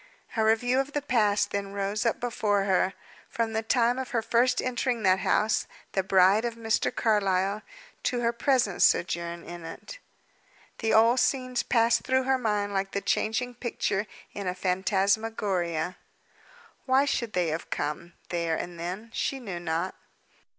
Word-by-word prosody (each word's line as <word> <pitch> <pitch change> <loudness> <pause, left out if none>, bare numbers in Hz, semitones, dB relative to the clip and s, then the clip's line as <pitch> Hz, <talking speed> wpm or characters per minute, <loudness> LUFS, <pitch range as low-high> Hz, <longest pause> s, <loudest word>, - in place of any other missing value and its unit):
A 220 - +2
review 245 +4 +3
of 275 +2 -2
the 290 - 0
past 210 -6 +2
then 200 -1 -3
rose 200 +2 -1
up 230 - 0
before 210 -4 0
her, 190 -1 +1 0.3
from 230 -1 -2
the 220 - 0
time 240 +2 +2
of 260 - -4
her 235 -2 -1
first 235 +3 +2
entering 245 -2 -1
that 190 -1 +4
house, 215 +2 +1 0.2
the 190 - +1
bride 190 +3 +4
of 235 -1 -2
Mr. 225 -1 0
Carlyle, 200 -2 +1 0.4
to 245 -2 -1
her 235 0 +1
present 235 -6 +1
sojourn 170 0 +2
in 175 -1 -9
it. 165 - -9 0.8
The 225 - 0
old 230 +3 +5
scenes 255 -2 +1
passed 230 -1 +3
through 260 0 +1
her 265 0 +1
mind 210 -3 -1
like 195 0 -2
the 200 - -1
changing 245 +5 0
picture 220 -4 -2 0.3
in 200 -2 -5
a 180 - -1
phantasmagoria. 190 -2 0 0.9
Why 265 +2 +4
should 235 -5 -1
they 175 -2 +1
have 160 +2 -4
come, 150 +4 -3 0.2
there 170 -2 0
and 175 +1 -6
then? 190 +7 -5
She 270 - -1
knew 195 -8 -5
not. 170 +2 -2
215 Hz, 160 wpm, -27 LUFS, 185-240 Hz, 0.9 s, old